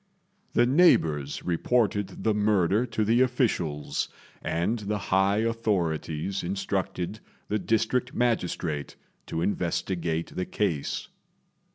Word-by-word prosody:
The 120 - +5
neighbours 80 - +3
reported 100 +1 0
the 110 - +3
murder 105 +1 +2
to 110 -2 -1
the 115 +4 +4
officials, 105 - 0 0.3
and 95 +8 0
the 105 0 -2
high 100 +2 +2
authorities 95 -6 -1
instructed 95 +1 -2 0.3
the 105 - +1
district 115 +4 +1
magistrate 90 - -1 0.3
to 80 - -2
investigate 85 -3 -1
the 90 - -1
case. 85 -9 -1
100 Hz, 100 wpm, -27 LUFS, 85-115 Hz, 0.3 s, The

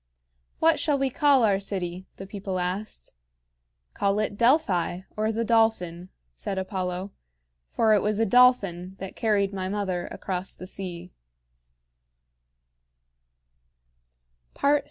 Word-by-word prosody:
"What 325 0 +3
shall 295 -3 +1
we 270 -1 0
call 280 -3 +4
our 200 -3 +3
city?" 185 -2 -4
the 195 - -8
people 195 -1 -5
asked. 180 - -4 0.8
"Call 200 0 +1
it 210 -1 -1
Delphi, 200 - +2
or 215 +1 0
the 230 +1 -1
Dolphin," 200 -6 +1 0.2
said 190 - -5
Apollo; 185 0 -3 0.6
"for 220 -1 +3
it 205 - +4
was 210 0 0
a 225 - +2
dolphin 195 -7 +3
that 195 -1 -7
carried 205 -3 +1
my 185 -1 -3
mother 190 -3 -2
across 185 -1 -5
the 185 - -9
sea." 180 -2 -7
195 Hz, 115 wpm, -26 LUFS, 185-220 Hz, 0.8 s, call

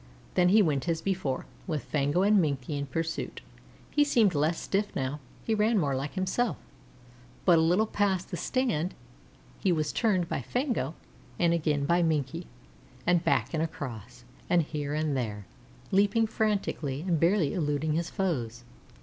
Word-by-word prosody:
Then 180 -1 +4
he 210 +2 +6
went 150 -1 0
as 165 -1 +1
before, 175 -8 -2 0.2
with 155 -5 -2
Fango 145 +5 +1
and 205 0 +5
Minkie 140 -2 -2
in 140 0 -3
pursuit. 165 +4 -3 0.5
He 295 - +4
seemed 230 -9 +3
less 155 +3 +1
stiff 205 +1 -1
now 135 +2 -2 0.2
he 225 - 0
ran 215 +1 +3
more 140 -7 +1
like 140 +6 -4
himself; 190 +5 0 0.9
but 175 -3 +6
a - - +4
little 175 +7 +3
past 200 -4 0
the - - -2
Stand 200 - -1 0.6
he 190 - +2
was 155 -3 0
turned 190 -7 +1
by - - -2
Fango 230 - -1 0.4
and 170 -1 +3
again 150 -4 +1
by 170 +3 +3
Minkie, 160 0 -1 0.6
and 175 0 +3
back - - +1
and 160 - 0
across, 130 - -6 0.3
and 175 -2 +4
here 145 -1 -3
and 155 -2 0
there, 105 -6 -3 0.5
leaping 205 +3 +3
frantically 200 -11 -1
and 170 -3 +2
barely 170 -2 +3
eluding 150 -1 0
his 170 +1 -1
foes. 120 - -2
165 Hz, 160 wpm, -29 LUFS, 145-195 Hz, 0.9 s, he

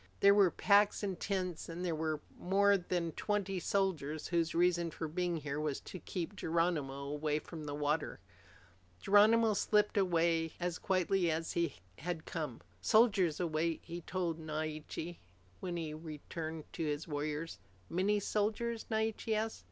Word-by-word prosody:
There 200 0 +8
were 200 -3 +6
packs 205 +3 +4
and 195 -3 -2
tents, 185 -5 -2
and 175 +2 -4
there 170 - 0
were 155 -1 -1
more 200 +2 +4
than 175 -3 -1
twenty 195 +1 -1
soldiers 165 -6 -1
whose 170 -1 +1
only 175 +1 +5
reason 175 -1 +1
for 160 0 -4
being 175 +2 -1
here 145 -1 -3
was 150 -3 -1
to 185 - -8
keep 180 +4 -4
Geronimo 160 -6 0
away 150 +1 -1
from 155 0 -7
the 145 -1 -4
water. 150 +1 -1 0.8
Geronimo 215 - +5
slipped 210 +1 +2
away 165 -3 +2
as 175 -1 -2
quietly 185 -1 +2
as 160 +1 -1
he 170 -4 0 0.2
had 170 0 -4
come. 150 -7 -4 0.2
"Soldiers 200 - +4
await," 165 -1 0
he 170 +1 -6
told 170 -2 -2
Naiche 155 +2 -4 0.4
when 175 -2 -3
he 165 -2 -3
had 155 +1 -8
returned 160 0 -6
to - - -3
his 150 +1 -2
warriors. 150 +2 -3 0.3
"Many 195 - +1
soldiers?" 220 +3 -1
Naiche 220 0 -1
asked. 220 +1 -1
170 Hz, 155 wpm, -34 LUFS, 155-195 Hz, 0.8 s, There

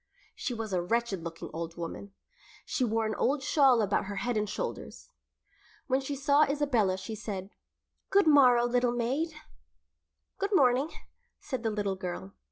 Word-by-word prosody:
She 250 - -4
was 220 -3 -4
a 180 - +1
wretched 205 -1 -1
looking 165 -1 -7
old 165 +1 -5
woman. 175 +4 -6 0.5
She 260 - -1
wore 225 -1 +1
an 215 - -1
old 270 +4 0
shawl 270 -6 +4
about 205 -1 0
her 200 +1 -5
head 235 +5 -1
and 210 -1 0
shoulders. - - -6 0.7
When 260 0 +1
she 280 +1 -4
saw 280 +2 +3
Isabella 275 -10 +2
she 190 +4 -6
said, 205 -2 -6 0.6
"Good 400 -1 +4
morrow, 255 -6 +6
little 245 0 +1
maid." 270 +7 -1 1.0
"Good 400 0 0
morning," 265 0 +4 0.5
said 260 -4 -4
the 225 - 0
little 205 -2 -1
girl. 175 - -6
235 Hz, 160 wpm, -29 LUFS, 200-275 Hz, 1.0 s, morrow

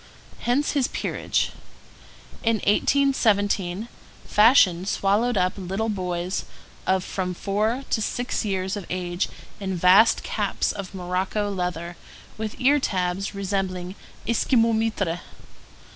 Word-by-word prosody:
Hence 255 +5 +1
his 275 -4 +1
peerage. - - -1 0.9
In 230 0 +2
1817 210 -5 +2 0.4
fashion 200 -5 +5
swallowed 205 +4 +1
up 185 0 +2
little 195 +4 -2
boys 180 -2 -2 0.4
of 190 -1 +2
from 185 -1 -3
four 215 +8 -1
to 220 - +1
six 245 +4 -2
years 190 -1 -1
of 200 -4 -6
age 180 0 -2 0.3
in 190 -2 -3
vast 185 +6 +5
caps - - -1
of 195 -1 -7
morocco 190 +3 -1
leather 175 -2 -3 0.4
with 220 -1 -4
ear 280 +3 +4
tabs 190 -3 -1
resembling 190 -2 -2 0.3
Esquimaux 230 0 +3
mitres. 215 -6 0
195 Hz, 115 wpm, -24 LUFS, 185-225 Hz, 0.9 s, fashion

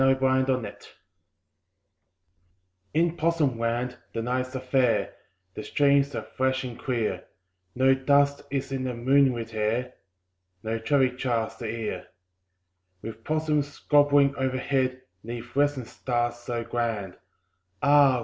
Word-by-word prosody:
IN 135 0 +5
POSSUM 130 0 +2
LAND 125 -6 -3 2.1
In 165 +1 +2
Possum 155 -7 +1
Land 120 +2 -1 0.2
the 115 - -2
nights 130 +2 -2
are - - -1
fair, 130 -2 +1 0.4
The - - -6
streams 140 -1 +2
are - - -3
fresh 130 0 -1
and 125 -2 -7
clear; 120 -4 -2 0.5
No 130 +1 +5
dust 140 +1 +3
is 135 0 -3
in 130 -1 -2
the 125 -1 -3
moonlit 120 -2 +2
air, 115 +4 -1 0.7
No 115 +1 -2
traffic 130 +1 +1
jars 115 -4 -1
the 115 - -5
ear. 110 -5 -4 1.0
With 115 0 -8
possums 150 -1 -1
gambolling 145 -1 +5
overhead, 130 0 -1 0.2
'Neath 120 +2 -7
western 145 -3 +1
stars 120 0 -2
so 120 -1 -4
grand, 115 -5 -3 0.7
Ah! 140 -3 +5
130 Hz, 125 wpm, -26 LUFS, 120-140 Hz, 2.1 s, IN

